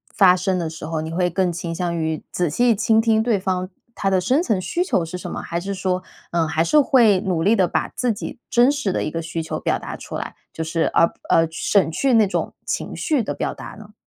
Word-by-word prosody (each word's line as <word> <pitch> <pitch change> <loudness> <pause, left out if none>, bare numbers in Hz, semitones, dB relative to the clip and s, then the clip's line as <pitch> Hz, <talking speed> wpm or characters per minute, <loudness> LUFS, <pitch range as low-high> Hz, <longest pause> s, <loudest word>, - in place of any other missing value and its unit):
发 185 -3 +6
生 185 +1 0
的 170 -2 -2
时 160 -1 -8
候， 160 0 -2
你 160 +1 -5
会 180 +1 +1
更 180 +1 0
倾 170 -1 -5
向 175 -1 -2
于 160 -1 -2
仔 175 -3 0
细 240 +8 +3
倾 220 +2 +3
听 220 -1 +3
对 225 -3 +2
方， 185 -1 -2 0.2
他 195 - -1
的 190 -1 +2
深 260 - +2
层 220 - 0
需 345 - -1
求 190 - 0
是 165 +2 -6
什 - - -7
么， - - -5
还 170 0 -3
是 200 +2 -4
说， 185 -1 -1 0.3
呃， 165 -2 +1
还 160 +1 +1
是 300 - +4
会 235 -8 +5
努 180 -5 -1
力 210 +5 +4
地 185 -4 +3
把 - - -1
自 245 -2 -1
己 210 - -7
真 245 +3 +5
实 285 -9 -1
的 - - -1
一 155 - -3
个 165 - -3
需 165 0 -4
求 160 - -4
表 - - 0
达 - - -7
出 - - -8
来， - - -5 0.2
就 160 - -3
是， 160 +1 -1
呃 165 - +3 0.2
呃， 165 0 +4
省 175 +1 +1
去 265 +10 +1
那 225 -2 +6
种 195 - -2
情 - - -3
绪 300 -7 0
的 - - -3
表 - - -3
达 - - -9
呢？ 215 -1 -13
185 Hz, 275 characters per minute, -21 LUFS, 165-220 Hz, 0.3 s, 发